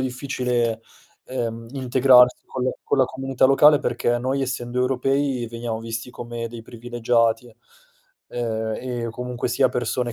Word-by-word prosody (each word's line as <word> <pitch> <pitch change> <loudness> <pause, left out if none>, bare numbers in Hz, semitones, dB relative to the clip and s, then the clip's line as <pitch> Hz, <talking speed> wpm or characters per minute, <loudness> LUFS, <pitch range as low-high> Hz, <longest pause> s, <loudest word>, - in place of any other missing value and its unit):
difficile, 125 -3 -1 0.5
uhm, 115 -2 -4
integrarsi 130 -1 +4
con 130 -1 -4
le 130 - +1
con 140 - 0
la 130 - +6
comunità 135 0 -1
locale, 145 +2 +6
perché 120 0 0
noi 135 +2 -1
essendo 125 -1 -2
europei 135 0 0
veniamo 115 -1 -4
visti 115 +1 -6
come 120 -1 -6
dei 115 0 -9
privilegiati, 115 0 -1 0.8
uhm, 110 -2 -2
e 120 -2 -4
comunque 125 0 -4
sia 130 +2 +3
persone 120 0 -2
125 Hz, 135 wpm, -23 LUFS, 115-130 Hz, 0.8 s, la